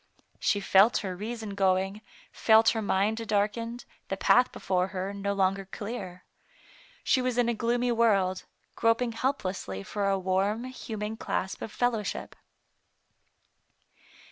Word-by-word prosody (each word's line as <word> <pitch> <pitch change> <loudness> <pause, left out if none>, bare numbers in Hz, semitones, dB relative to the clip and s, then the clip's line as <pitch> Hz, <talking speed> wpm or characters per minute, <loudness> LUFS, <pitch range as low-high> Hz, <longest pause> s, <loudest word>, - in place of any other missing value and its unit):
She 205 - +1
felt 200 +3 +5
her 185 -1 -3
reason 220 +1 -5
going, 195 +1 +1 0.3
felt 225 0 +5
her 225 - -1
mind 205 +2 +1
darkened, 225 +3 -1 0.2
the - - -3
path 250 +1 +4
before 185 -1 0
her 190 +1 -4
no 200 0 -2
longer 195 0 +1
clear. 195 -2 -7 0.8
She 260 - +3
was 250 -1 -1
in 245 -1 +3
a 235 - +1
gloomy 240 +2 0
world, 200 -6 +2 0.3
groping 230 +1 +2
helplessly 195 - -3
for 200 - -1
a 195 - +2
warm, 190 +4 0
human 220 -4 -5
clasp 190 -3 -3
of 220 - -5
fellowship. 230 -4 -2
210 Hz, 130 wpm, -28 LUFS, 195-230 Hz, 0.8 s, felt